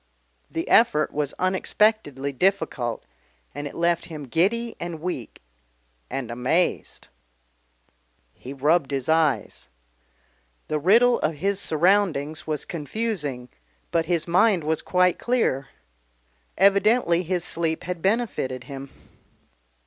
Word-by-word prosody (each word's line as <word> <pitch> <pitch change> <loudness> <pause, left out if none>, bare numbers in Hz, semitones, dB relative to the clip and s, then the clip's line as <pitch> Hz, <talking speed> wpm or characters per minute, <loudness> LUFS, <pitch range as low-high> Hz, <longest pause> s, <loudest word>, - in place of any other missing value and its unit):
The 165 - -4
effort 155 -10 +4
was 145 -1 -2
unexpectedly 185 - 0
difficult, 135 - -1 0.5
and 145 +1 -5
it - - -10
left 170 0 +1
him 155 -3 -8
giddy 205 - 0
and 170 -2 -5
weak 155 - -6 0.7
and 130 -2 -4
amazed. 130 +9 -1 1.2
He 130 - -10
rubbed 145 +2 +1
his 135 -3 -2
eyes. 155 -9 +1 1.0
The 155 - 0
riddle 235 +9 +4
of 155 +1 -1
his 195 +6 -1
surroundings 160 -4 +1
was 155 -2 -2
confusing 150 - -4 0.4
but 165 -1 +1
his 170 -2 0
mind 180 +1 +3
was 160 +1 0
quite 180 -1 +2
clear 225 - 0 0.9
evidently 200 -2 +4
his 180 0 -2
sleep 165 -2 -2
had 180 -1 -5
benefited 190 - -1
him. 135 0 -8
165 Hz, 110 wpm, -24 LUFS, 145-190 Hz, 1.2 s, effort